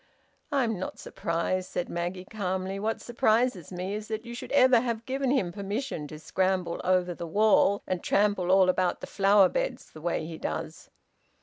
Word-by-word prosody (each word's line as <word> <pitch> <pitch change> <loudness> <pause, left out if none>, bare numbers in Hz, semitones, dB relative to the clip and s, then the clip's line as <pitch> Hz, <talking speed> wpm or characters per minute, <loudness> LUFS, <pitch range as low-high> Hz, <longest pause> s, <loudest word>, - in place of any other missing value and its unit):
"I'm 240 -8 +1
not 185 - -5
surprised," 170 +2 -2
said 175 - -2
Maggie 175 +2 -4
calmly. 190 -1 -3
"What 220 +2 -1
surprises 235 - +1
me 185 +2 -4
is 210 +1 -5
that 220 +1 -4
you 235 - -7
should 240 - -7
ever 255 -3 +6
have 235 -1 -3
given 270 0 -1
him 225 -10 +1
permission 200 - -4
to 155 - -9
scramble 185 +2 -1
over 180 -1 +2
the 170 0 -6
wall 200 +2 +3
and 185 -2 -2
trample 200 -3 +2
all 190 0 +6
about 185 0 +1
the - - -4
flower 195 -1 +4
beds - - -3
the 155 - -12
way 170 -1 -1
he 160 0 -7
does!" 80 - -5
190 Hz, 180 wpm, -28 LUFS, 180-220 Hz, -, ever